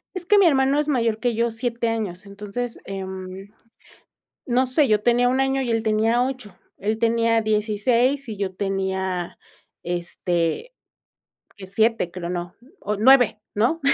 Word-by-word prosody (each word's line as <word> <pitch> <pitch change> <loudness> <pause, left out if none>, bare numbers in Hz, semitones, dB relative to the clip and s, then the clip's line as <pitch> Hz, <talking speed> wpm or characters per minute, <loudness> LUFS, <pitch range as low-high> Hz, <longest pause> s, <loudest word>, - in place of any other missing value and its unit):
Es 365 -1 -5
que 415 +3 +4
mi 395 - +6
hermano 275 0 +3
es 300 - -1
mayor 230 -6 +1
que 240 -2 0
yo 235 +1 +1
7 235 0 -2
años 210 -5 -4
entonces, 210 +4 -6
eh, 195 -1 -5 1.4
no 255 +1 +2
sé 280 +2 +3
yo 215 -1 +3
tenía 245 +1 +3
un 260 +1 +1
año 270 0 +1
y 240 - -2
él 225 -1 +1
tenía 225 +2 +2
8 255 -8 -5 0.2
él 215 +3 -1
tenía 230 0 +2
16 230 +6 +1
y 215 - -5
yo 190 -2 -3
tenía 190 -2 -2 0.5
este 175 - -2 0.9
7 200 -1 0
creo, 175 -1 -6
no 175 0 -4 0.3
o 210 +1 -2
9 245 -1 +5 0.2
¿no? 240 +11 +1
225 Hz, 150 wpm, -23 LUFS, 200-250 Hz, 1.4 s, mi